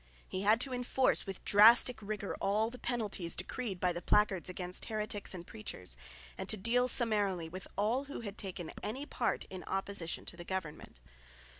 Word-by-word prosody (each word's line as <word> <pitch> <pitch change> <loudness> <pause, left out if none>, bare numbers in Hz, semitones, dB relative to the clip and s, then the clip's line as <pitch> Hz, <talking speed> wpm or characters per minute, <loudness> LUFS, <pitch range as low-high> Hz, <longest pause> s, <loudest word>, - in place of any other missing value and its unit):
He 185 - -3
had 215 +3 +4
to 265 -1 0
enforce 250 -1 +1
with 195 -1 -6
drastic 225 +3 +7
rigour 205 -1 -4
all 215 +3 +1
the 250 - -10
penalties 215 -8 -2
decreed 195 +2 -4
by 180 -1 +2
the 175 - -4
placards 195 -2 +2
against 180 0 -2
heretics 210 -3 -2
and 175 -1 -7
preachers, 130 - -6 0.4
and - - -4
to 215 - +4
deal 240 +5 +3
summarily 205 -9 +2
with 185 +3 -8
all 230 +7 +1
who 280 - -6
had 205 -3 -6
taken 180 -5 -5
any 260 +7 -4
part - - -1
in 185 -1 -6
opposition 195 -3 -3
to - - -7
the 175 - -8
government. 170 - -5
205 Hz, 175 wpm, -33 LUFS, 185-230 Hz, 0.4 s, drastic